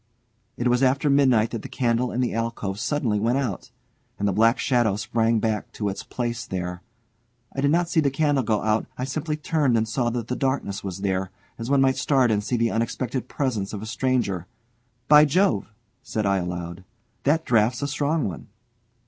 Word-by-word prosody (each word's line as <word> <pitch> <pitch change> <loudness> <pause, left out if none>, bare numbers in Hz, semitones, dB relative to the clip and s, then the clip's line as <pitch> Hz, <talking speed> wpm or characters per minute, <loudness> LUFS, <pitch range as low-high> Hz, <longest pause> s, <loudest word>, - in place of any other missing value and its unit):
It 120 - 0
was 125 +1 +2
after 135 +2 +3
midnight 130 -6 +4
that 115 - -4
the - - -8
candle 120 -1 0
in 125 - -1
the 125 - 0
alcove 115 -4 -3
suddenly 120 -8 0
went 115 +5 +1
out, 125 -9 -3 0.5
and 100 - 0
the - - +2
black 115 +4 +4
shadow 120 -6 +2
sprang 115 +2 +1
back 110 -1 -2
to 105 -2 -2
its 95 - -5
place 120 -2 -3
there. 90 -1 -4 0.7
I 135 - -1
did 140 - +3
not 170 +3 +2
see 165 - +1
the 145 -3 +3
candle 145 -1 +1
go 110 -2 0
out; 110 +1 +1
I 125 - -3
simply 150 +3 -2
turned 150 -5 +1
and 110 0 0
saw 120 +2 0
that 120 -2 -3
the 125 - -2
darkness 130 -8 -2
was 95 -1 -5
there, 95 -1 -1 0.3
as 115 +2 -4
one 140 -1 +4
might 135 0 +3
start 130 -2 +3
and 105 -1 +1
see 125 - -1
the 115 0 +1
unexpected 120 +2 -2
presence 115 -9 -2
of 105 0 -5
a - - -5
stranger. 110 -6 -1 0.6
"By 150 0 +8
Jove!" 145 - +2 0.3
said 110 -1 -3
I 100 0 +2
aloud; 90 0 -4 0.4
"that 160 +3 +1
draught's 120 +3 +2
a - - 0
strong 145 +1 0
one!" 90 - -7
120 Hz, 200 wpm, -24 LUFS, 105-135 Hz, 0.7 s, By